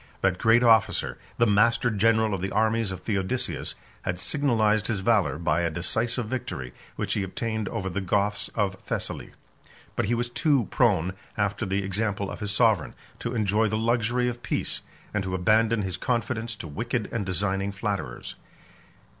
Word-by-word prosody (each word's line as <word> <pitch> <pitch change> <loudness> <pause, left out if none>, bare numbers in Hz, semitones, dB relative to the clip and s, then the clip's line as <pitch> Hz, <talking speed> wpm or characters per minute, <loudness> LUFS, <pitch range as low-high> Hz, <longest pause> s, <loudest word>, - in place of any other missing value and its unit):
That 95 -1 +2
great 115 +2 +5
officer, 115 -3 +3 0.2
the 120 - +4
master 115 +3 +3
general 110 +1 +3
of 95 - -2
the 95 - -1
armies 110 +1 +1
of 95 -1 -6
Theodosius, 105 +4 -2 0.3
had 90 -1 -3
signalized 110 -6 +2
his 105 -4 -1
valor 105 -6 +2
by 85 0 +1
a 85 - +1
decisive 110 +9 0
victory, 85 - -4 0.2
which - - -1
he - - 0
obtained 110 +2 -2
over 95 - -3
the 95 +2 -2
Goths 100 +2 0
of 100 -3 +1
Thessaly; - - -4 0.6
but - - +1
he 120 +4 +1
was 120 +1 -1
too 140 -3 +2
prone, 95 - +3 0.2
after 100 -2 0
the 95 +1 0
example 100 0 -1
of - - -7
his 105 - -3
sovereign, 105 -5 +2 0.2
to 120 +1 -3
enjoy 110 0 +2
the 110 - -1
luxury 120 +2 +1
of 120 0 -3
peace, - - -1 0.3
and 105 -2 0
to 95 0 -2
abandon 110 +4 +3
his 95 -2 -3
confidence 115 +1 -1
to 85 - -7
wicked 115 - -2
and 115 -3 -1
designing 95 +1 -1
flatterers. 100 0 -4
105 Hz, 170 wpm, -26 LUFS, 95-115 Hz, 0.6 s, great